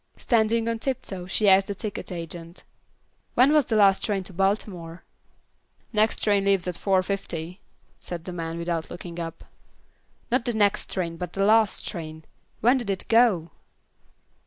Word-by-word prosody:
Standing 230 -1 +2
on 230 -1 -1
tiptoe 200 -8 -4
she 205 +2 +1
asked 195 0 +6
the 200 - -3
ticket 205 -1 -6
agent. 170 0 -7 0.7
"When 265 +4 +5
was 300 -4 +4
the 225 - 0
last 200 -2 +5
train 200 -3 0
to 190 - -10
Baltimore?" 185 -3 -2 0.9
"Next 215 +1 +2
train 205 -2 +3
leaves 195 -2 +2
at 180 - -1
4:50," 185 -2 -1 0.4
said 170 -2 -7
the 180 - -5
man, 165 -1 -4
without 170 -1 -3
looking 175 -1 -8
up. 165 -1 -6 0.9
"Not 250 0 +1
the 240 - -1
next 205 -2 +1
train, 170 -3 -2
but 180 0 -6
the 195 0 +1
last 220 -1 +3
train. 160 -2 -6 0.4
When 245 +4 +4
did 235 -5 -5
it 195 -2 -3
go?" 220 -9 +4
195 Hz, 160 wpm, -25 LUFS, 170-215 Hz, 0.9 s, asked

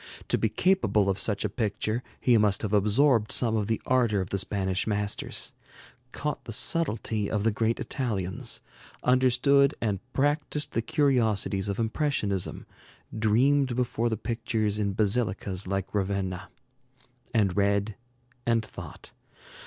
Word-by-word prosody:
To - - +2
be - - +1
capable 110 - +2
of 95 - -3
such 105 0 +1
a - - +3
picture, 110 +2 -2 0.2
he 125 - +3
must 105 -1 +2
have 105 -1 -2
absorbed 110 +3 +3
some 115 -3 +3
of 105 -2 0
the 115 - 0
ardor 120 -5 +2
of 95 0 -4
the 100 - 0
Spanish 95 0 -1
masters, 105 -1 -1 0.6
caught 150 0 -4
the 115 - -6
subtlety 110 -6 +1
of 105 -2 -1
the 115 - +3
great 115 +2 0
Italians, 100 -9 -3 0.4
understood 130 +3 +4
and 105 -4 -1
practiced 145 +2 0
the 115 - 0
curiosities 115 - +1
of 100 - -2
impressionism, 110 - -1 0.5
dreamed 125 +5 +2
before 120 -1 0
the 110 - -2
pictures 110 -2 -1
in 100 -1 0
basilicas 100 -3 0
like 95 0 -3
Ravenna, 95 -3 -2 0.8
and 100 -6 +1
read 100 +1 +1 0.5
and 115 -2 +1
thought. - - -10
110 Hz, 135 wpm, -27 LUFS, 100-125 Hz, 0.8 s, understood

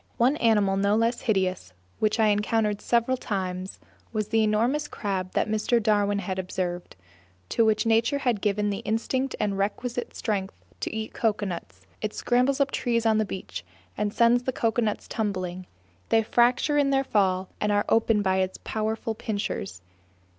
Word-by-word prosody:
One 250 +5 +3
animal 210 -6 +3
no 200 +1 +2
less 230 +2 +1
hideous, 185 - -1 0.3
which 215 +1 +1
I 220 -1 +5
encountered 210 0 +1
several 240 +2 +1
times, 185 -4 -4 0.3
was 215 -2 -2
the 225 0 +3
enormous 235 +8 +1
crab 190 -3 -3
that - - +1
Mr. 220 +2 +1
Darwin 205 -2 +2
observed, 185 -1 -3 0.5
to 230 - +2
which 215 0 +2
nature 230 +4 +3
has 245 -5 +1
given 205 0 0
the 200 - -3
instinct 240 +4 -1
and 200 -2 -1
requisite 240 +5 -2
strength 200 -4 -3 0.2
to - - -3
eat 220 0 -4
coconuts; 190 - -2 0.2
it 215 -1 -3
scrambles 250 +3 +2
up 280 -1 +2
trees 235 -2 0
on 220 -1 +4
the 215 - +2
beach 185 - -6 0.3
and 210 -1 -1
sends 235 +2 +4
the 260 - -2
coconuts 225 -3 -1
tumbling; 185 -4 -3 0.4
they 225 - +4
fracture 245 +6 +3
in 280 -1 +3
their 270 0 +2
fall 190 -6 +1
and 210 - +1
are 205 0 +2
opened 225 -2 +3
by 190 -1 +2
its 185 0 -1
powerful 220 +1 -2
pincers. 200 - -4
215 Hz, 160 wpm, -26 LUFS, 195-230 Hz, 0.5 s, I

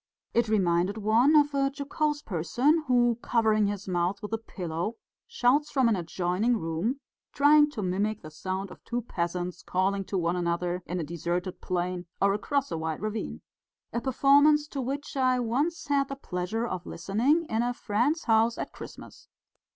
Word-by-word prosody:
It 235 0 +2
reminded 185 -1 +2
one 225 +8 +4
of 290 -1 +5
a 275 0 +1
jocose 290 +1 -2
person 245 - +1
who, 240 -2 +3
covering 220 -3 +2
his 205 -1 -4
mouth 180 +2 0
with 210 - -5
a 225 - 0
pillow, 180 -1 -4 0.3
shouts 285 +5 +2
from 265 -3 +2
an 225 - +3
adjoining 180 +6 0
room, 170 - -2 0.3
trying 295 +1 +6
to 230 -8 -5
mimic 200 +4 -1
the 155 - -9
sound 190 +4 -4
of - - -13
two 240 0 -3
peasants 175 -3 -3
calling 195 +2 0
to 195 - -2
one 170 0 0
another 175 +1 -1
in 180 +1 -3
a - - -2
deserted 170 +3 -3
plain 180 0 -2
or 200 0 +3
across 275 +7 -1
a 165 - -2
wide 160 -1 -3
ravine 215 +1 -4 0.5
a 235 - -1
performance 285 +3 +4
to 275 - -3
which 275 +4 -4
I 255 -2 +2
once 280 +8 -1
had 280 -2 +1
the 275 - -5
pleasure 215 -2 -3
of 185 -6 -5
listening 250 - +1
in 220 +1 0
a 245 +1 0
friend's 245 +8 0
house 225 +1 +3
at - - -4
Christmas. - - -11
220 Hz, 175 wpm, -28 LUFS, 180-270 Hz, 0.5 s, trying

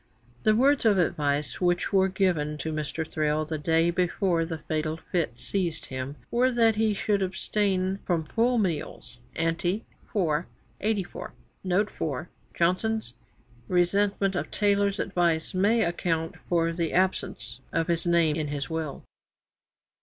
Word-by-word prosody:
'The 215 - +4
words 275 +4 +4
of 215 -4 +4
advice' 150 -4 0
which 175 +3 +1
were 190 -1 +5
given 175 -6 0
to 160 +2 -3
Mr. 155 +1 -3
Thrale 155 0 0
the 155 0 -4
day 165 +3 +2
before 175 0 +1
the 165 -1 -4
fatal 155 0 -2
fit 160 -8 -2
seized 175 -5 -1
him, 130 +2 -5 0.2
were 250 +2 +3
that 230 -2 +4
he 220 0 +2
should 200 0 0
abstain 190 0 0
from 170 -3 0
full 235 +9 +1
meals. 165 - -3 0.2
Ante, 170 +5 0 0.3
iv. 165 -4 +1 0.3
84, 205 -3 -2 0.3
note 190 +3 +1
4. 155 +2 -4 0.3
Johnson's 185 - 0 0.5
resentment 195 +2 +2
of 180 - -2
Taylor's 200 -1 +2
advice 170 -4 +1
may 210 +5 +3
account 165 -1 -1
for 165 -1 +2
the 165 -1 -2
absence 185 -9 0
of 165 - +1
his 170 -1 +1
name 170 -3 +3
in 155 -2 -2
his 145 +1 -4
will. 160 -3 -4
175 Hz, 140 wpm, -27 LUFS, 160-200 Hz, 0.5 s, were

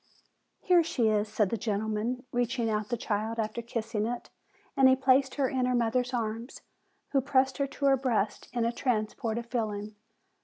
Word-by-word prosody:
"Here 360 -2 +5
she 240 -8 +1
is," 210 0 +1
said 210 -2 +1
the 230 - 0
gentleman, 220 +4 -2
reaching 240 -1 0
out 210 -1 -1
the 240 - -1
child 220 +1 -2
after 220 +1 -2
kissing 225 -2 -2
it; 240 0 -5 0.4
and 265 -1 +6
he 260 - +6
placed 265 0 +3
her 275 -2 +2
in 255 -1 0
her 250 - +1
mother's 245 +1 +1
arms, 230 0 -3 0.5
who 275 - +3
pressed 265 0 +1
her 280 - +1
to 280 +1 -4
her 270 -1 +5
breast 230 -6 -1
in 240 -2 0
a 235 - +1
transport 225 -2 -1
of 235 - -4
feeling. 215 -3 -3
235 Hz, 185 wpm, -29 LUFS, 215-260 Hz, 0.5 s, and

